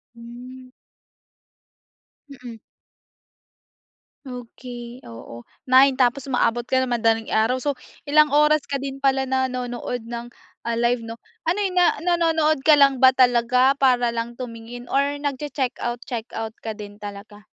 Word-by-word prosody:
Hmm. 250 Hz, +2 st, -12 dB, 1.6 s
Mm. 245 Hz, -4 st, -10 dB, 1.7 s
Okey, 245 Hz, -1 st, -9 dB
oo, 115 Hz, +1 st, -11 dB, 0.2 s
9 265 Hz, +1 st, +6 dB
tapos 255 Hz, +1 st, +1 dB
umaabot 240 Hz, -3 st, 0 dB
ka 260 Hz, 0 st, +1 dB
ng 260 Hz, -, -2 dB
madaling 225 Hz, -1 st, +1 dB
araw 235 Hz, +4 st, +1 dB
so 285 Hz, 0 st, -2 dB, 0.3 s
ilang 300 Hz, -1 st, +4 dB
oras 300 Hz, 0 st, +4 dB
ka 275 Hz, -1 st, -3 dB
din 275 Hz, -1 st, -5 dB
pala 270 Hz, -1 st, +1 dB
nanonood 250 Hz, -2 st, -2 dB
ng 235 Hz, +1 st, -8 dB, 0.3 s
ah, 235 Hz, -, -1 dB
live 235 Hz, 0 st, 0 dB
'no? 225 Hz, -, -6 dB, 0.3 s
Ano 355 Hz, +5 st, 0 dB
'yun 375 Hz, -2 st, -2 dB
na 355 Hz, -1 st, +5 dB
nanonood 325 Hz, -3 st, +2 dB
ka 310 Hz, -, +7 dB
lang 275 Hz, -2 st, +5 dB
ba 260 Hz, +1 st, +6 dB
talaga, 250 Hz, +1 st, +3 dB
para 250 Hz, -3 st, +3 dB
lang 235 Hz, 0 st, -4 dB
tumingin 240 Hz, 0 st, -9 dB
or 285 Hz, +1 st, 0 dB
nag-che-checkout 260 Hz, -4 st, -3 dB
checkout 225 Hz, -2 st, -5 dB
ka 220 Hz, -1 st, -6 dB
din 205 Hz, -1 st, -10 dB
talaga? 205 Hz, 0 st, -10 dB
250 Hz, 135 wpm, -22 LUFS, 235-275 Hz, 1.7 s, ka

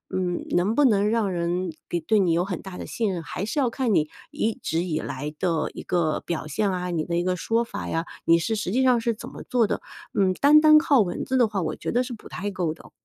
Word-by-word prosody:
嗯 180 Hz, -2 st, -1 dB
能 185 Hz, +6 st, +2 dB
不 290 Hz, +1 st, +4 dB
能 210 Hz, -3 st, +3 dB
让 220 Hz, -4 st, +1 dB
人 175 Hz, 0 st, -1 dB, 0.2 s
给 175 Hz, -, 0 dB
对 210 Hz, +6 st, +2 dB
你 175 Hz, -4 st, +3 dB
有 175 Hz, +2 st, +1 dB
很 185 Hz, -4 st, -4 dB
大 190 Hz, -2 st, -9 dB
的 -, -, -6 dB
信 220 Hz, -4 st, -1 dB
任， 170 Hz, -3 st, -4 dB
还 180 Hz, -, -5 dB
是 220 Hz, +7 st, -2 dB
要 265 Hz, -, +3 dB
看 245 Hz, -6 st, 0 dB
你 150 Hz, 0 st, +2 dB, 0.2 s
一 225 Hz, -, -1 dB
直 165 Hz, +2 st, -2 dB
以 160 Hz, -3 st, -2 dB
来 150 Hz, +2 st, -5 dB
的 170 Hz, -4 st, 0 dB
一 -, -, -7 dB
个 170 Hz, -4 st, 0 dB
表 165 Hz, -3 st, -4 dB
现 190 Hz, +7 st, 0 dB
啊， 180 Hz, -1 st, -3 dB
你 165 Hz, -2 st, -1 dB
的 170 Hz, -, -3 dB
一 175 Hz, -, +1 dB
个 185 Hz, 0 st, 0 dB
说 225 Hz, +6 st, 0 dB
法 235 Hz, -, -6 dB
呀， 165 Hz, +1 st, -1 dB, 0.2 s
你 165 Hz, 0 st, +6 dB
是 220 Hz, +7 st, -1 dB
实 210 Hz, -4 st, -3 dB
际 260 Hz, +3 st, +2 dB
上 250 Hz, -2 st, +4 dB
是 235 Hz, +1 st, +1 dB
怎 -, -, -9 dB
么 -, -, -9 dB
做 245 Hz, -2 st, +2 dB
的。 -, -, -2 dB, 0.3 s
嗯， 190 Hz, -2 st, +2 dB
单 300 Hz, +2 st, +6 dB
单 310 Hz, 0 st, +8 dB
靠 285 Hz, -5 st, +4 dB
文 180 Hz, -3 st, -2 dB
字 260 Hz, -, -1 dB
的 240 Hz, -3 st, +5 dB
话， 200 Hz, -3 st, -2 dB
我 -, -, -2 dB
觉 -, -, -4 dB
得 245 Hz, +1 st, +2 dB
是 250 Hz, 0 st, -6 dB
不 225 Hz, -, -11 dB
太 205 Hz, +3 st, -4 dB
够 175 Hz, -5 st, -1 dB
的。 -, -, -16 dB
190 Hz, 290 characters per minute, -25 LUFS, 170-230 Hz, 0.3 s, 单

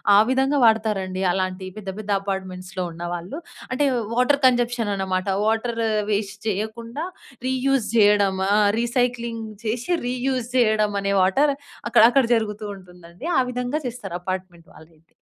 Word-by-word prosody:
ఆ -, -, +8 dB
విధంగా 270 Hz, +2 st, +2 dB
వాడతారండి. 210 Hz, -4 st, +1 dB
అలాంటి 185 Hz, 0 st, -2 dB
పెద్ద 200 Hz, -2 st, -6 dB
పెద్ద 215 Hz, -1 st, -8 dB
అపార్ట్‌మెంట్స్‌లో 185 Hz, -2 st, -4 dB
ఉన్న 170 Hz, +1 st, -8 dB
వాళ్ళు. 175 Hz, -, -6 dB, 0.3 s
అంటే, 255 Hz, +3 st, +1 dB, 0.3 s
వాటర్ 250 Hz, +3 st, +3 dB
కన్‌జప్షన్ 240 Hz, -3 st, +2 dB
అనమాట. 185 Hz, -1 st, -2 dB, 0.2 s
వాటర్ 225 Hz, +1 st, 0 dB, 0.3 s
వేస్ట్ 205 Hz, 0 st, -2 dB
చెయ్యకుండా, 230 Hz, -, -3 dB, 0.4 s
రీయూజ్ 260 Hz, -2 st, +1 dB
జెయ్యడమా, 200 Hz, -3 st, +4 dB, 0.3 s
రీసైక్లింగ్ 235 Hz, -1 st, -1 dB, 0.2 s
చేసి, 240 Hz, +9 st, -2 dB, 0.2 s
రీయూజ్ 250 Hz, -1 st, -1 dB
చెయ్యడం 215 Hz, -4 st, +3 dB
అనే 200 Hz, 0 st, 0 dB
వాటర్ 275 Hz, +11 st, +3 dB, 0.4 s
అక్కడ -, -, +5 dB
అక్కడ 270 Hz, +2 st, +4 dB
జరుగుతూ 215 Hz, -1 st, -2 dB
ఉంటుందండి. 180 Hz, -, -11 dB
ఆ -, -, +6 dB
విధంగా 250 Hz, +4 st, -2 dB
చేస్తారు, 230 Hz, -7 st, -7 dB
అపార్ట్‌మెంట్ 185 Hz, -2 st, -5 dB
వాళ్ళయితే. 160 Hz, 0 st, -19 dB
215 Hz, 130 wpm, -23 LUFS, 190-245 Hz, 0.4 s, ఆ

